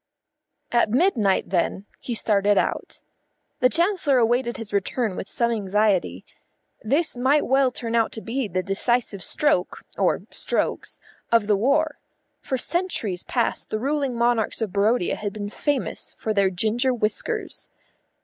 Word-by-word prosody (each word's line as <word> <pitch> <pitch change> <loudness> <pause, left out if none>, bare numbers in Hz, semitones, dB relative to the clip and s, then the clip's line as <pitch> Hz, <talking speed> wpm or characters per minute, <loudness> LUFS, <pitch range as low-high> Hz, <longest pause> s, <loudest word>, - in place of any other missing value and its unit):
At 235 -2 +3
midnight, 230 - +2
then, 190 +2 0
he 240 - -4
started 205 -2 +2
out. - - -1 0.6
The 250 - +4
Chancellor 335 -4 +2
awaited 240 +1 +1
his 215 -2 -8
return 205 +1 -1
with 190 - -6
some 235 -1 0
anxiety. 195 - 0 0.6
This 285 +8 0
might 265 +4 +2
well 265 0 +3
turn 235 -2 -5
out 230 -1 +2
to 220 - -6
be 245 +2 -2
the 185 -1 -2
decisive 205 +1 0
stroke 240 -12 0 0.2
(or - - +2
strokes) - - -2 0.3
of 230 -3 +4
the 210 0 +3
war. 290 +8 +1 0.4
For 260 - -2
centuries 250 - -2
past 240 -2 -1
the 215 - -1
ruling 275 0 -1
monarchs 235 -2 +1
of 220 -5 -3
Barodia 205 0 +2
had 205 -2 -4
been 205 -1 -5
famous 285 0 -2
for 220 - -2
their 200 -2 +3
ginger 220 +7 +1
whiskers. 245 - -2
230 Hz, 145 wpm, -24 LUFS, 205-260 Hz, 0.6 s, The